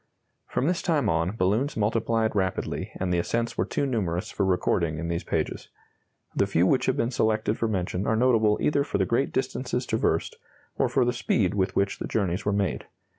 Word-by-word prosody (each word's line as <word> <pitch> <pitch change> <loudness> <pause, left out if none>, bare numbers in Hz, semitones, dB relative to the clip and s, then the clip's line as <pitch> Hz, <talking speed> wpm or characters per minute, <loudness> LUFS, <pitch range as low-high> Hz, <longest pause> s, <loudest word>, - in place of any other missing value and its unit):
From 125 - -1
this 175 +2 +1
time 165 -6 +1
on 85 +5 0
balloons 115 +9 0
multiplied 110 +1 +1
rapidly 95 -3 -2
and 90 -1 -1
the 85 - +2
ascents 115 +6 -1
were 90 - 0
too 140 - -1
numerous 95 -10 -2
for 100 - -1
recording 90 -3 +1
in 85 +2 -4
these 85 0 -2
pages. - - -3 0.7
The - - +2
few - - +2
which - - +2
have - - +1
been 115 - 0
selected 110 -2 +1
for 115 - +1
mention 95 -1 -2
are 110 - +2
notable 110 -3 +3
either 145 -1 +2
for 140 - -2
the 95 - +2
great 120 +7 0
distances 125 -1 -2
traversed, 110 -8 0 0.4
or - - +1
for 130 - +2
the 120 - +1
speed 105 -6 +1
with 95 -2 0
which 100 0 0
the - - -3
journeys 95 -4 -1
were 100 - +2
made. 100 -1 -1
110 Hz, 200 wpm, -26 LUFS, 95-120 Hz, 0.7 s, notable